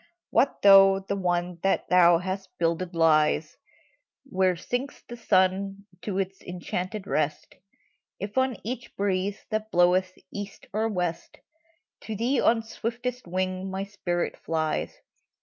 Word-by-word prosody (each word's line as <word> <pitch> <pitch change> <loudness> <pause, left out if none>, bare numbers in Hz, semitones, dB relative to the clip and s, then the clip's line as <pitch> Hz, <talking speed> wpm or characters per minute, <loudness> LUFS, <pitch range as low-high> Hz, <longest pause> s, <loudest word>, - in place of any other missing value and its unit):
What 275 - +2
though 195 -1 +8
the 195 +1 -3
one 175 -2 -1
that 195 - +1
thou 175 -2 +6
hast 190 +2 -4
builded 170 +1 -1
lies 155 -1 +3 0.7
Where 185 -8 +1
sinks 245 - -4
the 240 - -7
sun 195 -2 +1 0.2
to 200 -3 -3
its 195 0 -3
enchanted 180 +3 -4
rest. 155 -5 -1 0.7
If, 200 +2 -5
on 260 -3 +1
each 245 +2 -6
breeze 195 0 -1
that 215 0 -2
bloweth 180 0 +3 0.2
east 205 -1 -7
or 220 +2 +1
west, 180 -5 -3 0.7
To 220 - -4
thee, 240 +6 +1
on 225 0 +3
swiftest 240 +1 -4
wing, 185 +1 -2
my 190 +1 -3
spirit 185 -4 -3
flies 155 -1 -2
190 Hz, 130 wpm, -26 LUFS, 180-210 Hz, 0.7 s, though